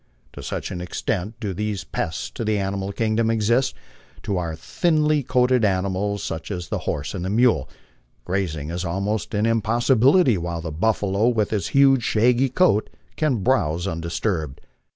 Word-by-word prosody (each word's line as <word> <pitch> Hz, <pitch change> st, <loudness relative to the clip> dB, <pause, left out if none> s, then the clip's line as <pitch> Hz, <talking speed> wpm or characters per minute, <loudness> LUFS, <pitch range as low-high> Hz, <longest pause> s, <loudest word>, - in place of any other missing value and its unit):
To -, -, -9 dB
such -, -, -4 dB
an 90 Hz, -, -5 dB
extent 90 Hz, +4 st, -3 dB
do 105 Hz, -5 st, -3 dB
these 105 Hz, 0 st, -3 dB
pests 80 Hz, -, -4 dB
to -, -, -5 dB
the 110 Hz, -1 st, +1 dB
animal 95 Hz, 0 st, -2 dB
kingdom 110 Hz, +1 st, 0 dB
exist, 115 Hz, +3 st, +1 dB, 0.4 s
that -, -, -21 dB
to 100 Hz, -, -1 dB
our 85 Hz, -3 st, -3 dB
thinly 155 Hz, -, +1 dB
coated 125 Hz, -1 st, +2 dB
animals, 100 Hz, 0 st, 0 dB
such 80 Hz, 0 st, -5 dB
as 90 Hz, -4 st, -5 dB
the -, -, -2 dB
horse 75 Hz, 0 st, -3 dB
and 95 Hz, -1 st, -3 dB
mule, 115 Hz, -, +3 dB, 0.6 s
grazing 85 Hz, -5 st, -2 dB
is 90 Hz, +2 st, -3 dB
almost 100 Hz, +5 st, -2 dB
an 105 Hz, +1 st, +1 dB
impossibility, 120 Hz, -, +3 dB
while 85 Hz, -1 st, -4 dB
the 80 Hz, -1 st, -5 dB
buffalo 100 Hz, +4 st, +1 dB
with 110 Hz, -4 st, +1 dB
his 105 Hz, -3 st, -1 dB
huge 135 Hz, -2 st, +6 dB
shaggy 120 Hz, +4 st, +2 dB
coat 125 Hz, -, +2 dB, 0.3 s
can 135 Hz, -10 st, 0 dB
browse 90 Hz, -, +1 dB
undisturbed. 85 Hz, -3 st, -3 dB
105 Hz, 160 wpm, -23 LUFS, 90-120 Hz, 0.6 s, huge